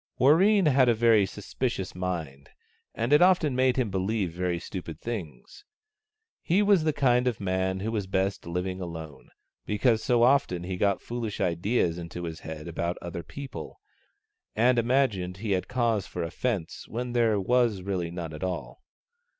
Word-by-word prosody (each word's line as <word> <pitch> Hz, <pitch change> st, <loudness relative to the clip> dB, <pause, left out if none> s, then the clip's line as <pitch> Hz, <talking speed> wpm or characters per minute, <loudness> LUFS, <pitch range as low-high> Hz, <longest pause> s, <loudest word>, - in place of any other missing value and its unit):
Warreen 185 Hz, +9 st, +5 dB
had 130 Hz, -4 st, +4 dB
a 120 Hz, -, +4 dB
very 110 Hz, -3 st, +4 dB
suspicious 105 Hz, +1 st, -4 dB
mind, 80 Hz, -7 st, -4 dB, 0.5 s
and 115 Hz, +5 st, 0 dB
it 150 Hz, -, +6 dB
often 175 Hz, -7 st, +4 dB
made 130 Hz, 0 st, +2 dB
him 120 Hz, -6 st, 0 dB
believe 95 Hz, -1 st, -1 dB
very 90 Hz, 0 st, -1 dB
stupid 85 Hz, -3 st, -7 dB
things. 95 Hz, -, -7 dB, 0.8 s
He 190 Hz, +5 st, +2 dB
was 200 Hz, -5 st, +4 dB
the 155 Hz, -, +3 dB
kind 125 Hz, -3 st, +2 dB
of 120 Hz, -3 st, -1 dB
man 95 Hz, -1 st, -1 dB
who 110 Hz, +3 st, -2 dB
was 105 Hz, -4 st, -2 dB
best 95 Hz, -1 st, -1 dB
living 90 Hz, +2 st, -3 dB
alone, 80 Hz, -4 st, -8 dB, 0.4 s
because 110 Hz, +2 st, +2 dB
so 120 Hz, -3 st, +3 dB
often 120 Hz, -9 st, +3 dB
he 95 Hz, +1 st, -3 dB
got 100 Hz, +1 st, +1 dB
foolish 115 Hz, -3 st, -4 dB
ideas 90 Hz, 0 st, 0 dB
into 85 Hz, +1 st, -7 dB
his 80 Hz, -1 st, -5 dB
head 80 Hz, -1 st, -8 dB
about 85 Hz, +1 st, -2 dB
other 85 Hz, 0 st, -6 dB
people, 125 Hz, -, -8 dB, 0.8 s
and 120 Hz, +3 st, +4 dB
imagined 115 Hz, -8 st, +1 dB
he 105 Hz, +1 st, -3 dB
had 95 Hz, -1 st, 0 dB
cause 115 Hz, -5 st, 0 dB
for 90 Hz, -, -4 dB
offence 90 Hz, +1 st, -3 dB
when 120 Hz, +1 st, -4 dB
there 115 Hz, -4 st, +3 dB
was 115 Hz, -2 st, +1 dB
really 90 Hz, -3 st, -2 dB
none 85 Hz, -2 st, -6 dB
at 75 Hz, -, -7 dB
all. 95 Hz, -, -4 dB
100 Hz, 165 wpm, -27 LUFS, 90-125 Hz, 0.8 s, it